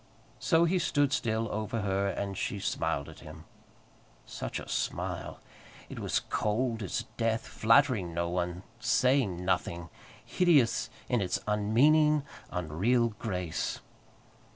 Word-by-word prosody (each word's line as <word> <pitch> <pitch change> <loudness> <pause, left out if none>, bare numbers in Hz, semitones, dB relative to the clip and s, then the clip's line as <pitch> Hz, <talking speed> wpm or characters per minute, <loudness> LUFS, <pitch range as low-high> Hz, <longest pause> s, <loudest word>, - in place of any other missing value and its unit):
So 165 -1 +3
he 180 +2 +2
stood 145 -4 +1
still 115 -2 0
over 110 +1 -2
her, 100 0 0
and 100 0 -3
she 100 - -2
smiled 70 -6 -1
at - - -12
him. - - -11 0.8
Such - - -5
a - - -9
smile! - - -3 0.5
It - - -7
was - - 0
cold 115 +2 -1
as 95 -7 -2
death, 115 0 0
flattering 115 - +3
no 85 +1 -1
one, 90 +1 -2 0.2
saying 125 -12 +2
nothing, 85 -2 -1 0.4
hideous 145 -2 +3 0.2
in 120 -3 +1
its 90 -2 -1
unmeaning, 140 +9 +4 0.3
unreal 95 +9 +1
grace. 90 -7 -3
110 Hz, 125 wpm, -30 LUFS, 90-125 Hz, 0.8 s, unmeaning